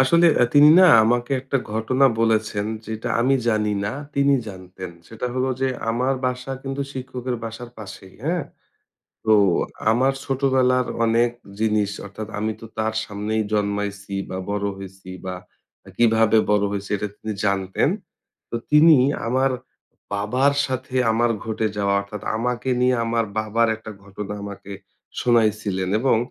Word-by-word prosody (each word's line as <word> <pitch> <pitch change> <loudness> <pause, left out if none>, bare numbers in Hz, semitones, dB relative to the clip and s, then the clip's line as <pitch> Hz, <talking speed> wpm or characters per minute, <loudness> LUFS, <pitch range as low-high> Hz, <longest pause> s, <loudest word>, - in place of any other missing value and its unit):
আসলে 170 +6 +5
অ্যা 120 - +4
তিনি 145 +1 +8
না 185 - +8 0.2
আমাকে 120 +3 +1
একটা 135 +1 -1 0.2
ঘটনা 130 +5 +2
বলেছেন 110 -2 +1 0.2
যেটা 110 0 -4
আমি 135 +3 +3
জানি 105 -2 +1
না, 100 - -2 0.2
তিনি 140 0 +4
জানতেন। 95 -1 -9 0.2
সেটা 115 +2 -5
হলো 130 +1 0
যে 135 - +2 0.2
আমার 125 +4 +1
বাসা 125 +1 -3
কিন্তু 135 +1 -3
শিক্ষকের 125 -1 -4
বাসার 115 +2 -7
পাশেই। 95 -2 -10
হ্যাঁ? 170 0 0 0.8
তো 110 - +4 0.6
আমার 130 +4 +2
ছোটবেলার 130 -2 +2 0.2
অনেক 115 +1 +3 0.3
জিনিস 105 -2 +1
অর্থাৎ 105 +2 -7
আমি 110 +1 -1
তো 115 - -8
তার 110 0 0
সামনেই 105 +1 -2
জন্মাইছি 100 -1 -2
বা 95 - -4
বড় 100 0 -1
হইছি 95 -1 -11 0.2
বা 90 0 -3 0.5
আ - - -11
কিভাবে 115 -1 +4
বড় 105 -1 +3
হইছি, 100 -1 -4
এটা 105 - -3
তিনি 110 - -5
জানতেন। 95 -1 +1 0.6
তো - - -4 0.2
তিনি 155 0 +7 0.3
আমার 130 +2 +2 0.6
বাবার 125 +8 +2
সাথে 130 0 -5 0.2
আমার 120 +2 +2 0.2
ঘটে 110 0 -1
যাওয়া, 100 -1 +1
অর্থাৎ 100 0 -8
আমাকে 125 +3 -2
নিয়ে 125 0 +3
আমার 115 0 0
বাবার 110 +2 +1
একটা 110 0 -10
ঘটনা 100 +1 -7
আমাকে 100 0 -8 0.5
শুনাইছিলেন 105 -5 +1
এবং 130 -3 +3
110 Hz, 145 wpm, -22 LUFS, 105-130 Hz, 0.8 s, তিনি